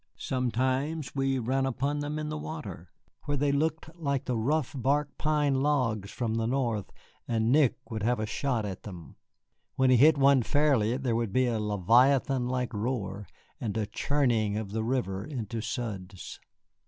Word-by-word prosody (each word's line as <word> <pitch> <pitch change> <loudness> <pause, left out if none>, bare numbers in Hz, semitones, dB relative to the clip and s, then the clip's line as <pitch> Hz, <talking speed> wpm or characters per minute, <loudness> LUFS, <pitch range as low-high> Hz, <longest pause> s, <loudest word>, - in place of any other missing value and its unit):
Sometimes 130 +4 -1
we 135 -1 0
ran 130 +2 0
upon 140 +3 -1
them 145 +1 -3
in 155 0 -3
the 155 - -3
water, 125 - -7 0.4
where 145 0 -1
they 140 +1 +2
looked 160 +2 -1
like 140 -5 -2
the 125 - -1
rough 135 +5 0
bark 140 +3 0
pine 145 -3 +2
logs 120 -9 +1
from 115 -2 -2
the 115 0 0
North, 120 -5 -1 0.4
and 115 0 +1
Nick 145 -3 +4 0.2
would 110 -1 -3
have 120 +2 +1
a 110 - -1
shot 115 0 -1
at 95 -3 -5
them. 90 -6 -10 0.6
When 130 -1 +3
he 125 - +6
hit 150 +4 +6
one 140 -1 +5
fairly 125 -3 +2
there 130 -4 -1
would 115 -3 -1
be 130 +5 +3
a 115 -3 0
leviathan 120 +6 +3
like 125 -1 -2
roar 105 -3 -3 0.3
and 110 -2 -3
a 110 - 0
churning 115 -5 +1
of 105 -3 -4
the 110 +1 -1
river 110 -6 -1
into 115 -4 -4
suds. 105 -5 -5
125 Hz, 170 wpm, -29 LUFS, 110-140 Hz, 0.6 s, he